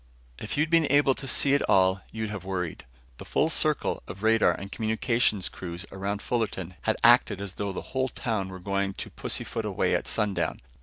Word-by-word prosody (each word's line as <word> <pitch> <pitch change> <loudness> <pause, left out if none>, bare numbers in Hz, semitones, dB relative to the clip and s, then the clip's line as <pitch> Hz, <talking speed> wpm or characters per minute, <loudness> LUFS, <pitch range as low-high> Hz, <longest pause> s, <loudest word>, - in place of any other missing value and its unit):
If - - -4
you'd 155 +2 +1
been 165 -4 +4
able 145 -1 +5
to 135 - -5
see 140 +2 +3
it 140 - +3
all, 95 0 +4
you'd 110 -1 -4
have 100 -3 -5
worried. 90 -7 -4 0.3
The - - -7
full 160 - +1
circle 155 -2 +1
of 95 +3 -9
radar 110 0 +4
and 100 0 -6
communications 110 -2 0
crews 90 +1 -6
around 100 +2 -3
Fullerton 100 -7 -2
had - - 0
acted - - +6
as 100 -2 -6
though 100 +1 -3
the 95 - -5
whole 130 0 +1
town 110 -5 -2
were 95 - -7
going 100 +1 -1
to - - -7
pussyfoot - - -3
away - - 0
at - - 0
sundown. 100 -7 0
100 Hz, 195 wpm, -27 LUFS, 95-125 Hz, 0.3 s, acted